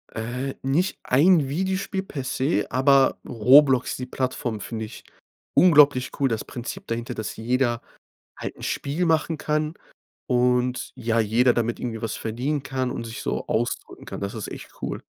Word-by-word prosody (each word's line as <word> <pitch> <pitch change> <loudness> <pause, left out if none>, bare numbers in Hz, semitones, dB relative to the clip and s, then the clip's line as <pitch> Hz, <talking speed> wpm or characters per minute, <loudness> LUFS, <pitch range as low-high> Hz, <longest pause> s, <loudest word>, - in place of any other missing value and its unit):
Äh, 125 +4 -3
nicht 155 +8 0
ein 150 +1 +4
Videospiel 190 +4 -1
per 140 -8 -6
se, 125 -6 0
aber 135 +1 +4
Roblox, 130 +3 +5
die 125 - -4
Plattform, 125 -4 -3
finde 110 +2 -4
ich 110 - -11 0.5
unglaublich 145 -7 +5
cool. 135 -1 +3
Das 115 -2 -2
Prinzip 120 -1 -7
dahinter, 115 +1 -3
dass 110 - -5
jeder 120 +1 0 0.6
halt - - -5
'n - - -15
Spiel 150 +6 -1
machen 160 -1 +1
kann 155 +1 -1 0.5
und 125 0 +1
ja, 115 0 0
jeder 115 +3 +3
damit 120 0 -1
irgendwie 115 -3 -4
was 115 -1 -3
verdienen 130 +6 -2
kann 130 -3 -2
und - - -4
sich 115 +4 -7
so - - -2
ausdrücken 120 +2 -2
kann. - - -7
Das 100 +3 -4
ist 110 - -5
echt - - -9
cool. - - -4
125 Hz, 160 wpm, -24 LUFS, 115-145 Hz, 0.6 s, Roblox